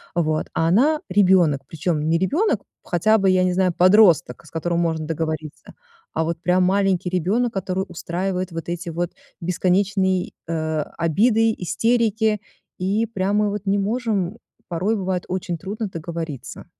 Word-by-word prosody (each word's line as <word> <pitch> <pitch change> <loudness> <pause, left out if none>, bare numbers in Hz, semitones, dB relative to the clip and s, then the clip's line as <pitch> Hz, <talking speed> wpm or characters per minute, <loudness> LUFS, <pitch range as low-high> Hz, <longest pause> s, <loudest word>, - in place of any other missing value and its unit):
Вот, 155 -2 0
а 165 - +1
она 280 - +3
ребёнок, 185 -7 +4
причём 155 -1 -1
не 165 - +3
ребёнок 305 - +1 0.2
хотя 215 +6 +2
бы, 195 -2 +2
я 185 0 +3
не 180 -1 +1
знаю, 185 -1 +2
подросток, 180 - +4
с - - -16
которым 170 +1 -1
можно 160 -2 -1
договориться, 155 -1 -4 0.4
а - - 0
вот 165 0 -3
прям 180 +1 +2
маленький 190 -2 +1
ребёнок, 205 +7 0
который 190 0 -2
устраивает 185 +2 -3
вот 165 -1 -6
эти 175 0 -4
вот 170 +1 -2 0.3
бесконечные, 185 +1 +1 0.2
э, 160 -1 -1 0.2
обиды, 220 +7 +3
истерики. 220 +2 +1 0.4
И 200 +5 +1
прямо 205 0 0
вот 205 0 -4
не 200 +1 +2
можем 210 -2 -1 0.3
порой 185 +6 0
бывает 185 -2 -2
очень 180 -2 -3
трудно 205 +5 -4
договориться. 165 -4 -6
185 Hz, 145 wpm, -22 LUFS, 170-205 Hz, 0.4 s, ребёнок